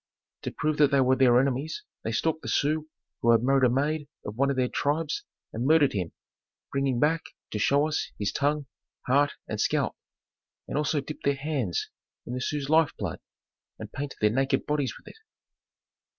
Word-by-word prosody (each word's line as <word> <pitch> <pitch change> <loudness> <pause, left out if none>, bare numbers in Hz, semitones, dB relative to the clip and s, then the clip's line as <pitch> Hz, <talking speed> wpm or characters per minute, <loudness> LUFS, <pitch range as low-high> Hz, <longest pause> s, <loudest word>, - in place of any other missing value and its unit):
To - - -4
prove 150 +1 -1
that 145 -2 +5
they 140 -1 +3
were 130 0 +4
their 125 -2 +5
enemies 135 +4 -1 0.2
they 115 - -2
stalked 160 +7 0
the - - -8
Sioux 155 +2 +1 0.3
who 120 - +2
had 115 0 +5
married 135 0 +4
a - - +5
maid 145 +4 0 0.2
of 105 - -5
one 140 +3 +2
of 140 - 0
their 130 -1 +2
tribes 150 +4 -1 0.3
and 115 - -2
murdered 155 -2 +5
him, 90 -5 -2 0.6
bringing 135 -3 0
back 160 +3 +3 0.3
to 105 - -2
show 140 +7 +3
us 155 - -2
his 105 -1 -1
tongue, 145 +1 0 0.4
heart, 140 +3 +3
and - - -2
scalp, - - +1 0.7
and - - -4
also 150 0 +1
dipped 150 +3 -8
their 140 0 +3
hands 135 - -2 0.4
in 120 - -5
the 125 - -3
Sioux's 145 +2 -2
life 160 +1 +3
blood - - -4 0.6
and - - -9
painted 145 0 -5
their 105 0 +4
naked 135 +3 +1
bodies 145 -3 -1
with - - -19
it. - - -12
140 Hz, 190 wpm, -27 LUFS, 125-150 Hz, 0.7 s, that